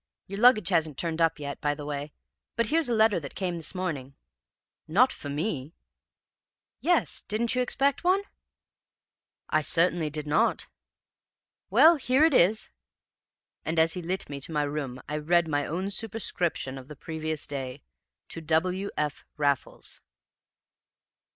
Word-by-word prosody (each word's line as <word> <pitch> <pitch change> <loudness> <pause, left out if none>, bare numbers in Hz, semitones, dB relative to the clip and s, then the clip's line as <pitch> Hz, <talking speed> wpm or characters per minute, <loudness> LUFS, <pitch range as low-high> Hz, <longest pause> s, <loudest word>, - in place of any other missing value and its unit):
Your 195 +1 -6
luggage 220 -5 +6
hasn't 160 -6 +1
turned 165 -1 -1
up 165 0 +3
yet, 140 -1 -6
by 145 0 +1
the 145 - -8
way, 145 0 -4 0.4
but 235 - +1
here's 320 -3 +2
a - - +1
letter 220 -3 +4
that 140 -4 -9
came 180 -3 -2
this 165 +3 -3
morning.' 145 -8 -4 0.7
"'Not 225 +12 +4
for 145 - -8
me?' 150 -1 -3 1.0
"'Yes; 350 0 +1
didn't 220 +2 0
you 250 - +1
expect 275 +3 +1
one?' 375 +3 +3 1.3
"'I 155 - +3
certainly 165 0 +3
did 150 0 -4
not!' 150 +1 +1 1.0
"'Well, 330 +1 +7
here 265 +1 +2
it 320 - +3
is.' 215 -1 +3 0.9
"And, 160 +1 -2
as 160 0 +4
he 180 - -5
lit 185 +3 -3
me 140 -1 -6
to 150 - -6
my 150 -1 +1
room, 145 -3 -4
I 150 - -2
read 170 +2 +2
my 145 -2 0
own 185 +5 -3
superscription 180 -11 -2
of 130 - -13
the 150 - -9
previous 155 +1 -4
day 135 -1 -6 0.5
to 165 - -6
W. 180 +5 0
F. 150 -2 -2
Raffles! 140 -2 -1
165 Hz, 150 wpm, -27 LUFS, 150-205 Hz, 1.3 s, Well